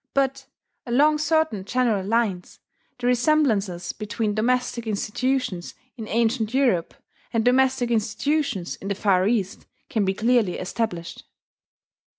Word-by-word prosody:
But, 275 0 0 0.4
along 295 +5 +3
certain 305 -9 +1
general 225 -2 +1
lines, 205 -4 -1 0.4
the 245 - -6
resemblances 240 - +1
between 215 0 -2
domestic 235 +1 0
institutions 215 -2 -2 0.2
in 225 -4 -7
ancient 230 +1 0
Europe 240 -11 +1 0.4
and 225 -1 0
domestic 255 -1 +3
institutions 235 - -1
in 195 - -8
the 200 - -1
Far 190 -2 +2
East 205 -5 -1 0.2
can 215 - +1
be 190 0 0
clearly 225 -3 +2
established. 185 -3 -4
230 Hz, 120 wpm, -24 LUFS, 200-255 Hz, 0.4 s, along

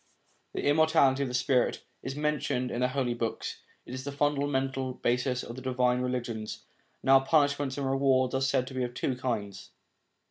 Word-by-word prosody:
The - - -3
immortality 145 -2 +4
of 135 - 0
the 125 - -3
spirit 130 0 +1 0.2
is 130 - -5
mentioned 145 -4 -1
in 120 - -3
the 125 - +4
Holy 130 -2 -1
Books; 115 -1 -3 0.3
it - - -9
is 130 0 -5
the 140 - -4
fundamental 140 -2 0
basis 125 +1 0
of 115 - -7
the 130 - -8
divine 125 -1 +1
religions. 120 -4 -3 0.4
Now 135 0 +7
punishments 140 -1 +1
and 140 - -2
rewards 135 -1 +2
are 130 - 0
said 130 -1 +2
to - - -10
be 130 -1 -1
of 120 0 -4
two 130 - -1
kinds. 110 -6 -4
130 Hz, 180 wpm, -29 LUFS, 125-140 Hz, 0.4 s, Now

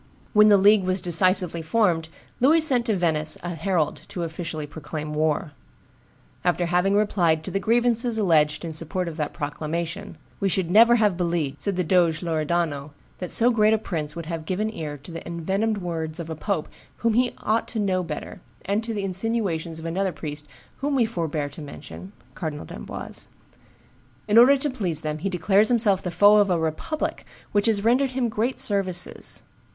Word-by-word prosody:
When 210 -1 +6
the 205 - +7
league 205 +1 +5
was 185 +1 +1
decisively 180 0 +3
formed, 165 -3 +1 0.3
Louis 300 +6 +5
sent 255 -6 +3
to 215 -3 +1
Venice 160 -3 +2
a 175 0 -4
herald 170 -3 -1
to 175 - -5
officially 160 -2 -5
proclaim 150 0 -6
war. 155 0 0 0.9
After 175 0 +1
having 180 +3 +1
replied 175 -7 +2
to - - -6
the 195 - 0
grievances 235 +2 +1
alleged 155 -6 +2
in 165 - -5
support 170 +3 -2
of 165 - -5
that 150 -2 -2
proclamation, 160 +3 -4 0.2
"We 195 - +1
should 180 -1 -1
never 230 +4 +7
have 210 -5 +2
believed," 170 -6 -2
said 200 -2 -1
the 180 - 0
Doge 170 -2 +2
Loredano, 155 -3 -1 0.3
"that 180 - -5
so 240 +2 +5
great 220 -1 +4
a - - +1
prince 160 -8 -4
would 170 -1 -6
have 165 -1 -5
given 210 +5 -2
ear 150 -6 -5
to 145 +5 -12
the 165 -1 -6
envenomed 195 +6 -1
words 165 -3 -4
of 165 -1 -6
a - - -4
pope 190 -1 -2 0.4
whom 230 - +3
he 245 +2 +1
ought 220 +2 0
to 225 - -4
know 190 -3 +1
better, 160 -4 -7 0.2
and 205 +3 0
to 225 0 -4
the 200 - -3
insinuations 190 -5 -2
of 160 - -8
another 185 +3 -1
priest 150 -3 -7 0.3
whom 280 +1 -1
we 245 -4 +3
forbear 160 -8 -3
to 145 +3 -11
mention 150 +6 -10 0.2
(Cardinal 155 -4 -5
d'Amboise). - - -7 1.0
In 215 +2 +6
order 270 +4 +7
to 290 +2 -2
please 180 - -1
them, 155 0 -3
he 195 +5 -2
declares 195 +4 +3
himself 215 -6 +3
the 180 - -4
foe 205 +4 +5
of 205 -1 +4
a 180 - +2
republic 160 - -3 0.3
which 205 +1 +2
has 210 -3 +2
rendered 255 +4 +3
him 250 -2 -1
great 230 +4 -2
services. 190 -4 0
180 Hz, 185 wpm, -24 LUFS, 160-215 Hz, 1.0 s, the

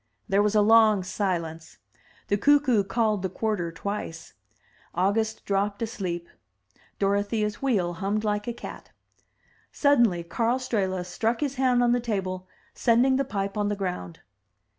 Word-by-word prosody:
There 195 +1 +3
was 210 +1 +1
a 210 - +5
long 215 -2 +5
silence; 170 -4 -3 0.5
the 205 - +2
cuckoo 265 -2 +4
called 215 0 0
the 190 - -2
quarter 195 -4 -2
twice; 165 -2 -6 0.6
August 215 +5 0
dropped 200 +1 0
asleep; 180 -6 -4 0.7
Dorothea's 205 +2 0
wheel 200 -11 +1
hummed 200 +4 -2
like 210 0 -1
a - - 0
cat. 235 - -9 0.8
Suddenly 235 - +3
Karl 230 +8 0
Strehla 190 -8 -1
struck 225 +7 -1
his 285 -3 0
hand 255 -2 +2
on 240 - +3
the 245 - +3
table, 190 -5 -3 0.3
sending 250 +2 +3
the 275 - +1
pipe 200 -6 -3
on 205 -1 0
the 205 - -1
ground. 180 - -5
205 Hz, 140 wpm, -26 LUFS, 190-230 Hz, 0.8 s, a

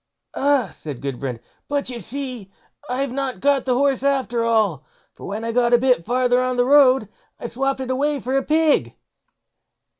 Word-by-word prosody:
"Ah!" 275 -7 +1
said 145 -5 -8
Gudbrand, 135 -3 -4 0.3
"but 285 -3 -1
you 240 - -6
see 250 -5 -6 0.4
I've 260 +1 -2
not 270 0 -3
got 280 -1 +2
the 255 -2 +1
horse 275 -1 +1
after 265 -4 0
all; 215 -10 +1 0.3
for - - -11
when 210 +3 -5
I 230 - -2
got 240 0 +2
a - - +8
bit 250 -8 +1
farther 250 0 +2
on 255 0 -1
the 245 - +3
road, 265 -4 +5 0.3
I - - -8
swopped 265 +3 -2
it 260 0 -3
away 285 +2 0
for 260 +1 -3
a 270 - +3
pig." 310 +2 +1
255 Hz, 180 wpm, -21 LUFS, 235-275 Hz, 0.4 s, a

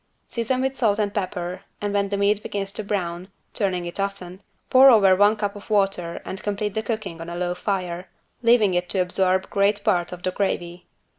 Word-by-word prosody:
Season 250 +2 -1
with 265 0 -1
salt 220 -5 +2
and 205 -2 -1
pepper 180 -2 -3 0.2
and 205 -1 -2
when 200 -1 +1
the 200 - -1
meat 200 +1 +2
begins 195 -1 -4
to 215 - -3
brown 180 -3 -3 0.3
turning 185 -4 -1
it 175 +3 -7
often 195 -2 -4 0.3
pour 265 +1 +8
over 200 -6 +6
one 205 +3 +4
cup 205 -1 -3
of 205 - -12
water 195 -5 0
and 190 - -6
complete 205 0 -2
the 220 - -1
cooking 215 -7 -4
on 165 - -7
a 170 - -5
low 175 0 -1
fire, 180 -2 -3 0.3
leaving 230 -5 +4
it 175 0 -1
to - - -1
absorb 185 +1 +1
great 200 +1 +2
part 175 -5 +1
of 180 0 -8
the 185 - 0
gravy. 175 -2 -3
200 Hz, 205 wpm, -23 LUFS, 180-210 Hz, 0.3 s, pour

